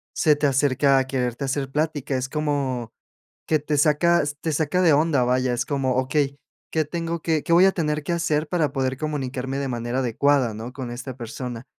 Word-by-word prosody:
se 150 -2 +4
te 145 0 +1
acerca 135 0 +3
a 130 - 0
quererte 125 0 -2
hacer 135 0 -2
plática. 145 -2 -1
Es 130 - -2
como 140 -6 -2 0.6
que 155 - +2
te 150 0 -2
saca 165 +3 +4
s 145 0 -3
te 160 - -1
saca 160 +4 +1
de 165 -4 +5
onda, 145 -3 +3
vaya. 125 0 +1
Es 120 +1 -1
como, 135 -3 0
okey, 140 +2 0 0.3
¿qué 155 -2 +1
tengo 170 +1 -3
que 160 -2 0
qué - - -4
voy 180 +2 +7
a 195 - +5
tener 150 -3 -1
que 175 - -2
hacer 160 -2 0
para 165 -5 0
poder 130 -1 -1
comunicarme 135 -3 -3
de 140 - -2
manera 120 +1 -2
adecuada, 130 0 +2
no?, 115 +3 -7
con 125 -3 -6
esta 125 +1 -6
persona 120 0 -6
140 Hz, 205 wpm, -23 LUFS, 130-155 Hz, 0.6 s, voy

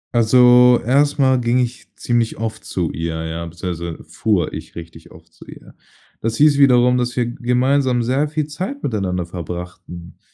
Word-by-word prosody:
Also, 125 +1 +5
erst 140 +4 +2
mal 130 -2 +3
ging 120 +1 +1
ich 125 0 -3
ziemlich 120 -2 -1
oft 110 0 -5
zu 85 -3 -3
ihr, 80 0 -4
ja, 80 +1 -5
beziehungsweise 85 -1 -6
fuhr 105 -5 -1
ich - - -9
richtig 85 -1 -11
oft - - -18
zu - - -15
ihr. - - -14 0.5
Das 115 0 -2
hieß 145 -1 +4
wiederum, 125 -2 +4
dass 125 0 -2
wir 125 - 0
gemeinsam 125 0 0
sehr 135 +5 0
viel 155 0 -2
Zeit 185 - -6
miteinander 95 -7 -2
verbrachten. 85 0 -9
120 Hz, 165 wpm, -19 LUFS, 90-130 Hz, 0.5 s, Also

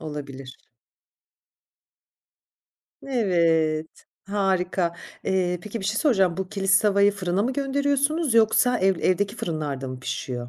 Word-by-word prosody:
Olabilir. 140 -4 -8 2.5
Evet. 165 - +1 0.4
Harika. 190 -3 0 0.3
Eee, 180 -2 0
peki 215 +3 -6
bir - - -7
şey 210 +2 -1
soracağım. 195 - +2
Bu 190 -1 -4
Kilis 195 0 +2
tavayı 200 -1 +3
fırına 190 -1 -1
mı 250 +4 -1
gönderiyorsunuz 280 +1 0
yoksa 230 +2 +4
ev 190 0 +2
evdeki 195 +2 +1
fırınlarda 145 -5 -4
mı 130 0 -7
pişiyor? 125 -1 -5
190 Hz, 115 wpm, -24 LUFS, 165-215 Hz, 2.5 s, yoksa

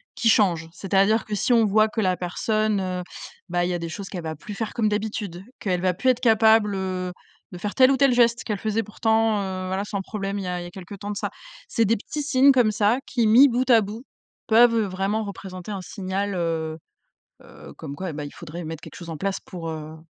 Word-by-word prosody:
qui 230 - +2
changent. 175 -7 +3
C'est-à-dire 195 +4 +2
que 215 - -6
si 240 +5 +1
on 230 -1 +5
voit 215 +1 +4
que 220 - -5
la 185 -2 +2
personne, 215 +4 0
heu, 180 -1 -3 0.5
bah, 175 0 +1
il - - -1
y 180 - -1
a 175 - -2
des 170 0 -5
choses 195 +3 -7
qu'elle 180 - -5
va 160 0 -4
plus 205 +7 -9
faire 215 +1 -4
comme 220 -3 +1
d'habitude, 205 -4 -3 0.2
qu'elle 180 -3 -1
va 185 -1 +2
plus 255 - +1
être 250 - +3
capable, 220 -3 +4
heu, 185 -1 -3 0.4
de 180 - -8
faire 205 +3 -4
tel 260 -1 +6
ou 270 - +2
tel 275 -1 +4
geste 235 0 +3
qu'elle 210 -3 -3
faisait 220 +1 -1
pourtant, 220 0 +1
heu, 185 -1 -4
voilà, 190 +2 -1
sans 200 -1 -3
problème, 200 0 -4
il 195 - -4
y - - -5
a 180 0 -2
il - - -6
y - - -7
a - - -9
quelques 190 +2 -10
temps 205 +1 -6
de 205 - -4
ça. - - -2 0.4
C'est 230 -3 +1
des 225 +3 +3
petits 295 +8 -5
signes 280 -1 +5
comme 245 -5 +3
ça 215 +3 +2
qui, 240 -4 +1
mis 235 +6 +7
bout 250 +1 0
à 230 -2 +7
bout, 210 +4 -6 0.4
peuvent 230 +1 +6
vraiment 195 +3 -1
représenter 190 -1 -8
un 195 -2 -4
signal, 195 +1 -3
heu 165 -2 -2 0.6
heu, - - -13
comme 145 -3 -7
quoi 185 +1 -4
et - - -6
ben 150 0 -5
il 145 - -8
faudrait 170 +1 -8
mettre 160 0 -6
quelque - - -11
chose 170 -2 -9
en 160 - -5
place 195 +3 -2
pour, 170 -3 -7
heu, 155 -1 -6
m - - -17
200 Hz, 250 wpm, -24 LUFS, 180-220 Hz, 0.6 s, mis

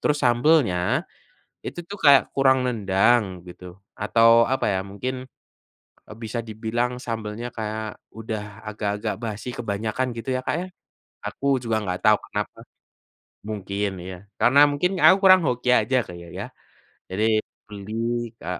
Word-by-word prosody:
terus 150 - +1
sambelnya 120 - +3 0.6
itu 175 - -5
tuh 200 - -6
kayak 140 -2 +8
kurang 130 -1 +4
nendang 110 +1 +3 0.2
gitu, 90 +1 -12 0.3
atau 115 +3 +4 0.2
apa 135 - 0
ya - - +1
mungkin, 125 +6 -4 0.9
e - - -12
bisa 115 +2 -3
dibilang 115 +3 -2
sambelnya 115 0 -4
kayak 110 0 -4 0.2
udah 110 -1 -5 0.3
agak-agak 105 +1 -3
basi, 110 +2 -5
kebanyakan 110 +3 -2
gitu 115 +3 -6
ya, 130 - -1
Kak, - - 0
ya. 185 - -5 0.6
Aku 140 - -7 0.2
juga 115 -2 0
nggak 90 -2 -3
tahu - - +6
kenapa. - - -4 0.9
Mungkin, 100 0 -2 0.2
ya, 90 - -7 0.2
karena 130 +4 +5
mungkin 150 +6 0
aku 190 - +8
kurang 185 -1 +8
hoki 125 0 -1
aja 125 +2 +3
Kak - - -9
ya 85 - -11
ya. - - -4 0.7
Jadi 105 +3 0 0.4
beli, 105 0 -9 0.5
ke - - -10
115 Hz, 140 wpm, -24 LUFS, 105-130 Hz, 0.9 s, kayak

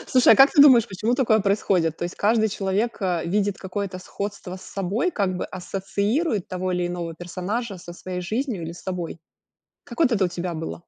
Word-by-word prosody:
Слушай, 255 -1 +6
а - - +5
как 270 +1 +8
ты 285 - +7
думаешь, 240 -5 +7
почему 215 +5 -1
такое 225 -4 +3
происходит? 190 -5 +1
То - - -2
есть 175 - -5
каждый 220 +1 +2
человек, 205 +3 -1
а, 175 -3 0
видит 200 +3 0
какое-то 190 0 -4
сходство 200 0 -6
с - - -13
собой, 200 - -1
как 190 - -1
бы - - -3
ассоциирует 200 - -2
того 185 0 -2
или 180 -1 0
иного 170 -2 -4
персонажа 195 +6 -4
со 175 -1 -10
своей 180 +1 -6
жизнью 220 0 -2
или 165 - -5
с 175 - -12
собой. 180 -3 -4 0.7
Как - - -11
вот 285 -7 +4
это 195 -4 +3
у - - +1
тебя 175 0 -4
было? 160 +1 -5
195 Hz, 205 wpm, -24 LUFS, 180-220 Hz, 0.7 s, как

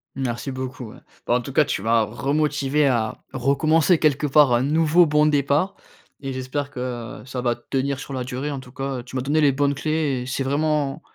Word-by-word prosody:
Merci 130 +1 -3
beaucoup, 130 -3 -6
ouais. - - -14 0.3
Bah, 120 - +1
en 125 - +1
tout 135 +2 -8
cas, 155 - +5
tu 125 - -3
m'as 115 +1 +3
remotivé 145 +5 0
à 115 -5 0
recommencer, 155 +6 +2
quelque 150 -1 +1
part, 145 -1 +5
un 120 - +3
nouveau 160 +4 +4
bon 150 -1 +3
départ 145 +4 +1 0.5
et 135 -1 -3
j'espère 130 +2 -3
que, 130 - -9 0.4
heu, - - -15
ça 130 0 -5
va 120 -1 +1
tenir 135 +3 -2
sur 140 - -7
la 130 -1 -2
durée. 130 +4 -4
En 140 - -4
tout 125 -1 -14
cas, 135 0 -3
heu, - - -8
tu 125 - -11
m'as 130 - 0
donné 145 +4 +1
les 145 -2 +4
bonnes 140 +1 +1
clés 150 -3 -1
et - - -8
c'est 130 +1 -2
vraiment 145 +1 0
135 Hz, 220 wpm, -23 LUFS, 130-150 Hz, 0.5 s, cas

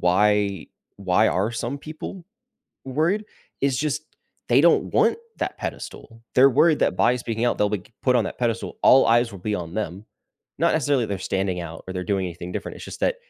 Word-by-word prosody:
why 100 0 +2 0.3
why 95 -2 +2
are 95 +5 0
some 120 +4 -3
people 160 +4 -8 0.6
worried, 165 +11 0 0.4
is 135 -2 +1
just 150 +2 -1 0.5
they - - +5
don't - - +4
want - - +3 0.2
that - - -3
pedestal, 115 0 -7
they're 135 +2 +7
worried 155 +4 +4
that 90 - +2
by 125 - +3
speaking 120 -1 -2
out, 120 - +1
they'll, 105 0 +2
like 105 +4 -5
put 125 -1 +3
on 120 - +3
that - - -6
pedestal 115 -2 -2
all 135 - +7
eyes 120 0 +3
will 100 - -9
be 105 +3 -2
on 85 -1 -6
them, 100 -1 -4 0.5
not 170 +1 +2
necessarily 140 -5 +1
they're 100 -2 -3
standing 95 -1 -1
out 80 -1 -8
or 95 - -5
they're 90 - -3
doing 95 -1 -1
anything 85 0 -7
different, - - -5
it's - - -9
just - - -9
that - - +1
115 Hz, 200 wpm, -23 LUFS, 95-135 Hz, 0.6 s, they're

